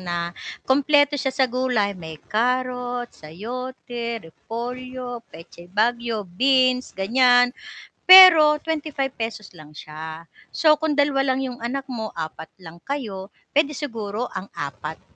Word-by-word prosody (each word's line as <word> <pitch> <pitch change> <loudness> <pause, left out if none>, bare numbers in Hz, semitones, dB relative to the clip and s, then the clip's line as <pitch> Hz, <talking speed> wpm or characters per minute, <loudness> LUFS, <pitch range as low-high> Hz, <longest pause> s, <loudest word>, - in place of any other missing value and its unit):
na 175 -1 -3 0.3
kumpleto 285 +1 +3
siya 265 - -1
sa 265 - +3
gulay, 250 -5 0
may 160 -2 -8 0.2
carrot, 245 +1 -1
sayote, 235 +6 -7
repolyo, 245 +4 -7 0.2
petchay 165 +1 -13
baguio, 230 +1 0
beans, 255 +5 +2
gan'yan. 245 +4 +4 0.6
Pero 330 -5 +9
₱25 300 -4 -3 0.4
lang 150 -2 -14
siya, 160 +2 -9 0.3
so, 310 -1 +4
kung 315 0 -1
2 275 -2 +2
lang 260 - -3
yung 245 - -8
anak 270 +3 -3
mo, 220 -4 -5
4 160 0 -7
lang 165 -1 -12
kayo 210 -8 -5 0.2
pwede 300 0 +3
siguro 230 -4 -4
ang 190 0 -6
4, 145 +2 -6
245 Hz, 125 wpm, -22 LUFS, 195-265 Hz, 0.6 s, Pero